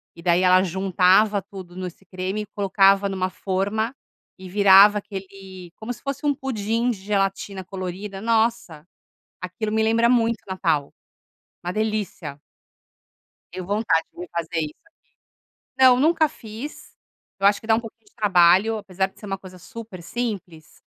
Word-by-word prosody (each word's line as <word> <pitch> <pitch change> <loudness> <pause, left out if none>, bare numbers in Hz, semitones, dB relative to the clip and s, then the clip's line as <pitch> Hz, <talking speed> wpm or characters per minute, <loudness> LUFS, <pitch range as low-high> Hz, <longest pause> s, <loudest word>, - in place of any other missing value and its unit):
E 170 - -12
daí, 175 0 +3
ela 185 0 +6
juntava 190 +2 +3
tudo 190 -2 -11
nesse 185 +1 -7
creme, 190 +3 -4
colocava 195 0 +3
numa 185 -1 -2
forma 205 +6 -2 0.4
e 185 0 -10
virava 200 +1 +7
aquele 190 -3 -10
como 220 +3 -6
se 240 - -16
fosse 275 +1 -4
um 285 -1 +2
pudim 230 -2 -1
de 210 - -6
gelatina 195 -1 -2
colorida. 195 +2 -6
Nossa! 220 -9 0 0.6
Aquilo 210 +4 -4
me 220 0 +1
lembra 230 +1 +3
muito 235 -2 +3
o 190 - -8
Natal. 160 -6 0 0.7
Uma 180 +1 -3
delícia! 215 -9 -3 1.2
Deu 185 0 -6
vontade 200 -5 +1
de - - -16
me 180 - -6
fazer 170 0 -3
isso 150 -1 -3
aqui. 330 - -28 0.8
Não, 255 -1 +7
nunca 315 +1 +3
fiz. 235 0 -10 0.5
Eu 195 - +5
acho 205 - +3
que 220 - -12
dá 220 - +5
um - - 0
pouco 225 -2 -10
de 410 - -27
trabalho. 195 0 +4
Apesar 190 -2 -2
de - - -22
ser - - -10
uma 195 -1 -3
coisa 185 -1 -13
super 210 0 -10
simples, 190 -8 -6
195 Hz, 155 wpm, -23 LUFS, 185-220 Hz, 1.2 s, virava